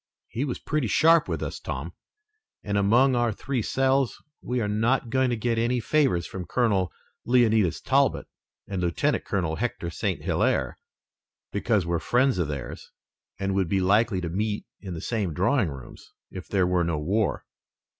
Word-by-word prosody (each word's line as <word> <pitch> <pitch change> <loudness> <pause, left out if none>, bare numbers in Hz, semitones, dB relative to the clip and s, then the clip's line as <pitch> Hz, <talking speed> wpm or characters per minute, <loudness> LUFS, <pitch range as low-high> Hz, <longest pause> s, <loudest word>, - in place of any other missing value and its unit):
He 125 +5 -2
was 130 - -3
pretty 150 -5 -1
sharp 165 - +4
with - - -3
us, - - -5
Tom, - - -5 0.7
and 100 -1 -2
among 120 +7 +4
our 120 -1 +2
three 130 +4 -3
selves, 135 +2 +1 0.2
we 125 0 -2
are 110 - -1
not 115 +3 0
going 130 0 +2
to 120 - 0
get 115 0 -1
any 120 +2 +1
favors 130 - +1
from 90 -3 -7
Colonel 100 -6 +1 0.3
Leonidas 110 -8 +3
Talbot - - +2 0.4
and 95 -2 -3
Lieutenant 85 -1 0
Colonel 85 -5 -1
Hector 120 -7 -3
St. - - -2
Hilaire - - 0 0.7
because 105 -2 +1
we're 85 0 0
friends 125 0 +2
of 85 - 0
theirs 70 -3 -6 0.5
and 100 0 -2
would 95 -3 0
be 95 - +2
likely 100 +2 +2
to 85 - -3
meet 105 +4 -2
in 95 -4 -7
the 80 - -6
same 100 -9 -2
drawing 100 - +2
rooms, 65 -3 -11 0.2
if 95 - -8
there 95 -3 +2
were 90 -1 +2
no 85 -2 -1
war." 95 +8 -1
105 Hz, 170 wpm, -26 LUFS, 90-120 Hz, 0.7 s, sharp